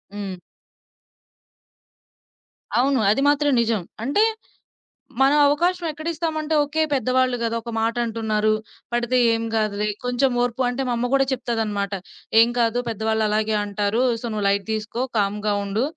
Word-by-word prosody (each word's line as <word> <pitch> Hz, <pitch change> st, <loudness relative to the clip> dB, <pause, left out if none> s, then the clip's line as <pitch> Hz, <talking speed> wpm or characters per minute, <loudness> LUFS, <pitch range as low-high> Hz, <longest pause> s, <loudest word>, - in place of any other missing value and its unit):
హ్మ్. 195 Hz, -3 st, -5 dB, 2.4 s
అవును. 270 Hz, +1 st, +2 dB
అది 220 Hz, -, +1 dB
మాత్రం 290 Hz, 0 st, +2 dB
నిజం. 225 Hz, -3 st, 0 dB, 0.2 s
అంటే, 285 Hz, -, +2 dB, 1.0 s
మనం 275 Hz, +2 st, +5 dB
అవకాశం 345 Hz, +5 st, +1 dB
ఎక్కడిస్తాం 320 Hz, +1 st, -3 dB
అంటే 310 Hz, +1 st, -3 dB
ఓకే, 305 Hz, +2 st, -1 dB
పెద్దవాళ్ళు 255 Hz, -1 st, +1 dB
కదా! 230 Hz, 0 st, -1 dB
ఒక 235 Hz, +1 st, -7 dB
మాట 225 Hz, +1 st, 0 dB
అంటున్నారు, 215 Hz, -1 st, 0 dB, 0.4 s
పడితే 240 Hz, +1 st, +1 dB, 0.2 s
ఏం 225 Hz, 0 st, -1 dB
కాదులే, 210 Hz, -1 st, 0 dB, 0.2 s
కొంచెం 250 Hz, +2 st, +1 dB
ఓర్పు 245 Hz, +1 st, -2 dB
అంటే 250 Hz, +2 st, -3 dB
మా -, -, +1 dB
అమ్మ 245 Hz, +1 st, 0 dB
కూడా 270 Hz, 0 st, +4 dB
చెప్తదన్నమాట. 215 Hz, -5 st, -2 dB, 0.5 s
"ఏం 230 Hz, +1 st, +6 dB
కాదు 235 Hz, 0 st, +2 dB
పెద్దవాళ్ళు 220 Hz, 0 st, -1 dB
అలాగే 215 Hz, +1 st, 0 dB
అంటారు, 205 Hz, +3 st, -1 dB, 0.2 s
సో, -, -, -6 dB
నువ్వు 210 Hz, -1 st, -2 dB
లైట్ 200 Hz, 0 st, 0 dB
తీసుకో 220 Hz, +3 st, -3 dB
కామ్‌గా 210 Hz, +1 st, 0 dB
ఉండు, 200 Hz, +4 st, -1 dB
230 Hz, 140 wpm, -22 LUFS, 215-270 Hz, 2.4 s, ఏం